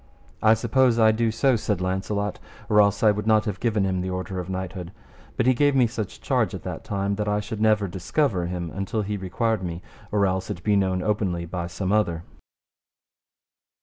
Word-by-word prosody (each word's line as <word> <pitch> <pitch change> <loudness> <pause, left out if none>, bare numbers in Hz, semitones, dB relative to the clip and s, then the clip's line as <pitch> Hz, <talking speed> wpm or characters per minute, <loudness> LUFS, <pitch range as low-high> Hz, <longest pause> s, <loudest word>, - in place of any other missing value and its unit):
I 110 +1 +6
suppose 120 +2 +2
I 110 -1 +6
do 115 +1 +1
so, 125 +4 +2
said 105 -3 -1
Launcelot, 95 +2 -2 0.3
or 105 0 +6
else 100 +1 +2
I 110 - +7
would 105 +1 -3
not 110 0 +4
have 105 -3 -3
given 110 -4 +1
him 95 -1 0
the 95 - -3
order 95 0 -4
of 90 +1 -5
knighthood; 95 -1 -5 0.5
but - - +2
he 130 - +5
gave 145 +2 +2
me 130 -2 +5
such 115 -3 -5
charge - - 0
at - - -8
that - - -6
time 100 0 -2
that 105 -1 -2
I 105 0 +1
should 105 +1 -5
never 105 -2 +3
discover 95 - 0
him 85 -2 -4
until 100 +3 -2
he 105 +1 -3
required 105 +3 -1
me, 85 -1 -5 0.3
or 105 -1 +3
else 95 0 -1
it 85 - -5
be 105 -1 +2
known 95 -2 +1
openly 95 -5 -1
by 85 0 -4
some 95 +2 -3
other. 85 -6 +1
100 Hz, 205 wpm, -24 LUFS, 95-110 Hz, 0.5 s, I